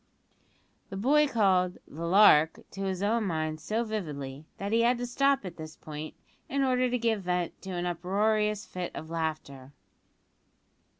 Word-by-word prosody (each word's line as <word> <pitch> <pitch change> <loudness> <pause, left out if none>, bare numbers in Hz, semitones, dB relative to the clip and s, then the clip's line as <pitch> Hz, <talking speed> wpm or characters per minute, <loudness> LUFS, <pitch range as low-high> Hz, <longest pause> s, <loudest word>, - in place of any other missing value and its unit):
The 195 - -6
boy 295 +8 +4
recalled 190 -7 +2
"the 165 +3 -6
lark" 170 -5 +6
to 195 - -7
his 190 0 -2
own 220 +2 +1
mind 155 -3 -2
so 225 +2 -1
vividly, 150 - -5
that 200 +1 -4
he 230 +1 +3
had 240 +1 +3
to 245 - -3
stop 275 0 +1
at 185 - -7
this 155 -1 -8
point, 155 0 -8 0.3
in 275 0 0
order 255 -1 +2
to 250 - 0
give 225 -3 0
vent 180 -2 -2
to 190 - -8
an 175 0 -2
uproarious 210 +4 0
fit 180 -1 -6
of 160 +1 -7
laughter. 155 -5 -4
190 Hz, 165 wpm, -29 LUFS, 160-225 Hz, 0.3 s, lark